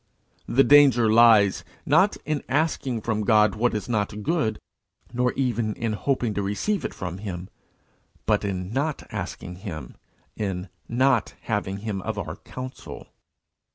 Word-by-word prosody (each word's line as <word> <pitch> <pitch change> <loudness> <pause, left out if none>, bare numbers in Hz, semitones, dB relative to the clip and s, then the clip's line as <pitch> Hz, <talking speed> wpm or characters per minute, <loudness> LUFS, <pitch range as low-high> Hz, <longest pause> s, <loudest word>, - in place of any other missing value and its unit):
The 135 +3 +4
danger 130 -5 +6
lies, 110 -4 +6 0.2
not - - +4
in 155 -1 -1
asking 135 -5 0
from 110 -1 -1
God 105 0 +4
what 120 +1 0
is 105 - -3
not 105 -2 -2
good, 150 -10 0 0.6
nor 125 +1 +1
even 120 -5 -1
in 115 -2 -2
hoping 120 0 -1
to 100 - -1
receive 105 - -1
it - - -3
from 90 0 -5
him, 95 -2 -6 0.8
but - - +2
in 95 -1 -3
not 145 +3 -1
asking 90 0 -6
him, 80 - -7 0.4
in 95 -3 -3 0.2
not 125 -1 +2
having 100 -2 -2
him 100 -3 -2
of - - -4
our - - -5
council. 130 0 -9
110 Hz, 145 wpm, -25 LUFS, 100-130 Hz, 0.8 s, danger